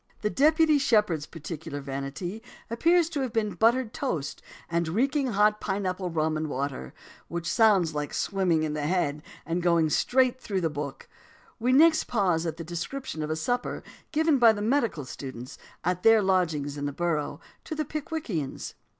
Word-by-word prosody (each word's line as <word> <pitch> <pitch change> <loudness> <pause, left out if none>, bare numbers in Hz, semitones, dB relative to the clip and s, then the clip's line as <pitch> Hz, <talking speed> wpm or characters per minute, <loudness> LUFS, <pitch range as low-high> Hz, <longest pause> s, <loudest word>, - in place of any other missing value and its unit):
The 210 - 0
Deputy 310 +1 +4
Shepherd's 210 - +2
particular 160 -2 -7
"vanity" 140 +9 -5 0.3
appears 335 +8 +3
to 295 -4 -2
have 260 -3 -2
been 215 -2 0
buttered 235 +1 +2
toast 165 - -3 0.3
and 170 0 0
reeking 270 - +1
hot 210 -1 +2
pine 200 0 -2
apple 185 0 -2
rum 155 -1 0
and 155 0 -3
water, 135 - -4 0.4
which 170 0 -4
sounds 195 -7 +4
like 150 -1 -3
swimming 180 -5 +1
in 155 -1 -1
the 150 -1 -2
head; 150 -4 0 0.2
and 170 +2 -1
going 170 -3 +3
straight 255 - +2
through 195 -5 -2
the 165 -2 0
book, 140 -2 -6 0.5
we 245 +3 +1
next 315 +4 +5
pause 180 -7 +1
at 160 0 -4
the 165 - -5
description 170 - -5
of 150 - -3
the 155 - 0
supper 245 +10 -2 0.3
given 315 -2 +3
by 235 -2 +8
the 205 - -5
medical 230 - 0
students, 130 -2 -8 0.2
at 180 +1 0
their 225 0 +6
lodgings 160 -7 0
in 145 0 -2
the - - -2
Borough, 160 -1 -2 0.3
to 315 - -5
the 310 0 -2
Pickwickians. 290 - -4
180 Hz, 175 wpm, -27 LUFS, 155-245 Hz, 0.5 s, by